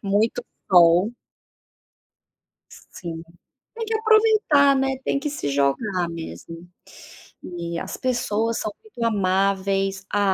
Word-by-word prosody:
Muito 210 +4 0 0.3
sol. 175 +4 +5 1.8
Sim, 165 -2 -7 0.5
tem 455 0 -4
que 445 - -3
aproveitar, 435 -11 +4
né, 265 0 0
tem 275 - 0
que 295 +1 -3
se 145 - -4
jogar 170 +7 0
mesmo. 165 - -9 0.8
E 170 -1 -5
as - - -6
pessoas 230 -3 -1
são 215 - -3
muito 325 - -7
amáveis, 195 -1 0
a 205 - +1
200 Hz, 110 wpm, -23 LUFS, 175-265 Hz, 1.8 s, sol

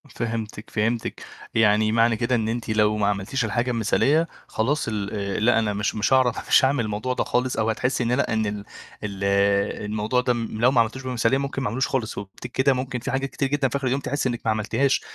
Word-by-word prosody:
فهمتِك، 110 -2 -4
فهمتِك. 115 +1 -2 0.3
يعني 110 0 +3
معنى 115 0 +3
كده 125 +1 +1
إن 110 -1 0
أنتِ 115 0 -3
لو 105 -1 +2
ما 105 -1 +1
عملتيش 105 +5 -1
الحاجة 120 +3 0
مثالية، 140 +8 +2 0.2
خلاص 145 +7 -1
ال 105 -3 -2
آآ 100 -1 -2
"لأ، 115 +1 +4
أنا 105 -2 0
مش 105 +2 -1
مش 105 +5 +1
هاعرف، 130 -3 +2
مش 135 - +6
هاعمل 130 -2 +1
الموضوع 110 +5 -2
ده - - 0
خالص" 125 +1 -1
أو 110 0 +1
هتحسّي 125 +3 0
إن 115 - 0
لأ، 125 -1 +1
إن 110 -1 +1
ال 105 0 -4 0.4
ال 100 -2 -5
آآ، 100 +1 +1
الموضوع 110 +4 0
ده 125 0 +1
لو 115 +1 +1
ما 120 -3 +5
عملتوش 125 +4 -3
بمثالية، 125 0 +1
ممكن 135 0 -3
ما 130 - -1
أعملوش 130 +5 0
خالص. 120 -5 -2
وبتك 100 +5 -8
كده 130 +2 +3
ممكن 130 -1 -3
في 135 +4 -4
حاجات 135 +1 -1
كتير 135 - -1
جدًا 140 -1 +1
في 140 - -1
آخر 135 - -2
اليوم 135 +3 0
تحسّي 145 -2 -1
إنِّك 120 -1 -4
ما 110 - +3
عملتيهاش، 115 +5 +1
115 Hz, 225 wpm, -24 LUFS, 105-130 Hz, 0.4 s, مش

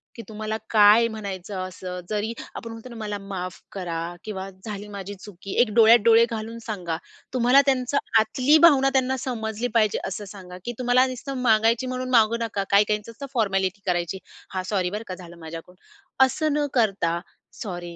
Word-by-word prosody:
की 230 - -7
तुम्हाला 215 0 -4
काय 215 +2 +6
म्हणायचं 200 -3 -6
असं. 180 0 -7
जरी 215 +2 -1 0.2
आपण 230 - -7
म्हणतो 225 +2 -9
ना 235 - -10
"मला 210 -2 -4
माफ 190 -2 -6
करा 175 -4 -4 0.2
किंवा 195 -2 -5 0.2
झाली 210 -1 -6
माझी 200 0 -6
चुकी." 195 0 -9
एक 240 - +3
डोळ्यात 230 +1 +8
डोळे 230 0 +7
घालून 225 +1 -5
सांगा. 180 -7 -3 0.4
तुम्हाला 250 +2 +5
त्यांचं 265 0 +1 0.2
आतली 255 +7 +3
भावना 270 -4 +4
त्यांना 265 0 +2
समजली 230 -2 -3
पाहिजे 215 -2 +3
असं 195 +2 -5
सांगा 180 -2 -10
की 240 - -2
तुम्हाला 250 +1 +4
नुसतं 270 +2 -6
मागायची 225 +1 +3
म्हणून 255 0 -3
मागू 230 -1 +4
नका. 205 -3 -2
काही 200 +1 +6
काहींच 210 +1 -2
असतं 230 +5 -8
फॉर्मॅलिटी 195 -4 0
करायची, 175 +1 -1 0.3
"हां. 185 -1 -2
सॉरी 185 -3 +1
बरं 210 +4 -5
का. 185 - -5
झालं 175 -2 -12
माझ्याकडून." 165 +3 -9 0.5
असं 310 +2 -1
न 295 0 +1
करता, 195 -9 +1 0.4
"सॉरी. 175 -4 -6
215 Hz, 175 wpm, -24 LUFS, 190-235 Hz, 0.5 s, डोळ्यात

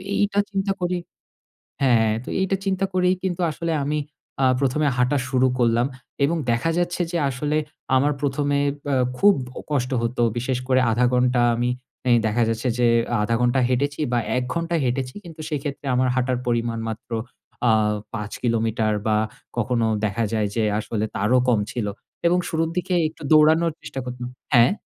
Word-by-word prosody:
এইটা 205 0 +1
চিন্তা 195 0 0
করি 180 0 0 0.8
হ্যাঁ, 130 -3 +5
হ্যাঁ 110 -1 +2
তো - - -9
এইটা 190 +1 +1
চিন্তা 195 0 +1
করেই 185 0 +3
কিন্তু 180 -1 -2
আসলে 165 +2 -3
আমি 150 +1 0 0.4
আ - - +5
১মে 140 +2 +1 0.2
হাঁটা 125 +3 +2
শুরু 130 -1 +3
করলাম 120 0 +3 0.4
এবং 165 +4 +2
দেখা 115 +8 +1
যাচ্ছে 175 0 0
যে 175 - 0
আসলে 145 +4 -1 0.4
আমার 145 +3 +3
১ম 145 +1 0
এ - - +1 0.2
ব - - -6
এ - - +3 0.2
খুব 205 0 +6 0.4
কষ্ট 130 -2 0
হত, 115 +2 -2 0.2
বিশেষ 125 +1 -1
করে 130 0 +4
আধা 120 +3 +2
ঘন্টা 125 0 +3
আমি 120 +1 0 0.4
এ - - +5
দেখা 110 +2 +2
যাচ্ছে 115 +3 -1
যে 120 - +4 0.3
আধা 115 +2 +1
ঘন্টা 125 +2 +3
হেঁটেছি 140 +4 0
বা 120 - +2 0.2
১ 125 - 0
ঘন্টা 170 0 -1
হেঁটেছি 125 +1 -2
কিন্তু, 160 -2 -9
সেক্ষেত্রে 145 -1 -4
আমার 130 0 +2
হাঁটার 130 -1 +1
পরিমাণ 115 -1 0
মাত্র 110 +2 -7 0.6
আ - - +6 0.4
৫ 105 -2 -4
কিলোমিটার 115 -2 +1
বা 105 -1 +3 0.4
কখনো 115 0 +1 0.2
দেখা 115 +3 -1
যায় 110 -2 +1
যে 115 - +1 0.2
আসলে 110 0 -2
তারও 115 +6 +3
কম 120 -4 +4
ছিল 120 -4 -2 0.4
এবং 175 +1 +3
শুরুর 160 0 0
দিকে 180 +1 -1 0.2
একটু 160 - -19
দৌড়ানোর 160 +2 +5
চেষ্টা 135 - -6
করতাম 125 0 -5 0.3
হ্যাঁ? 120 +5 +6
130 Hz, 175 wpm, -23 LUFS, 120-160 Hz, 0.8 s, খুব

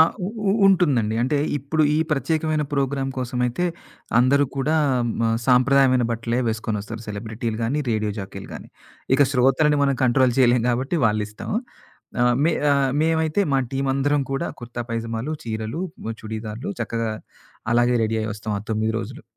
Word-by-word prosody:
ఆ! - - +11 0.2
ఉ - - -2 0.2
ఉ - - +3
ఉంటుందండి. 140 - +3
అంటే 145 +4 +1 0.2
ఇప్పుడు 150 +4 0
ఈ - - +2
ప్రత్యేకమైన 155 +1 0
ప్రోగ్రామ్ 135 -1 0
కోసమైతే, 125 +5 -1 0.5
అందరూ 140 +3 +4
కూడా 150 +4 +1 0.5
మ 115 -1 +2 0.2
సాంప్రదాయమైన 130 0 +4
బట్టలే 115 +1 -1
వేసుకొని 110 -1 -2
వస్తారు. 115 +2 -7
సెలబ్రిటీలు 110 +2 -4
గానీ, 140 +7 0
రేడియో 110 -1 0
జాకీలు 95 0 -7
గాని. - - -9 0.5
ఇక 145 - +5
శ్రోతలని 135 +3 +3
మనం 140 -2 +2
కంట్రోల్ 125 0 +3
చేయలేం 125 -2 +4
కాబట్టి, 135 +8 -1
వాళ్ళిష్టం. 105 0 -3 0.7
ఆహ్, 125 0 +4
మే 165 - +3 0.2
ఆహ్, 135 -2 +2
మేమైతే 160 +4 +1
మా 135 - +4
టీమ్ 135 0 -1
అందరం 145 +1 +1
కూడా 135 - -1
కుర్తా 120 0 -5
పైజమాలు, 115 +5 -3
చీరలు, 110 +8 -4 0.3
ఆహ్, 115 - -3
చుడీదార్లు 110 - -5
చక్కగా 115 -1 -2 0.6
అలాగే 120 +1 +3
రెడీ 110 +1 -1
అయ్యి 110 - -2
వస్తాం 105 0 -5
ఆ - - -3
9 110 +1 0
రోజులు. 120 +3 -7
125 Hz, 155 wpm, -23 LUFS, 115-140 Hz, 0.7 s, ఆ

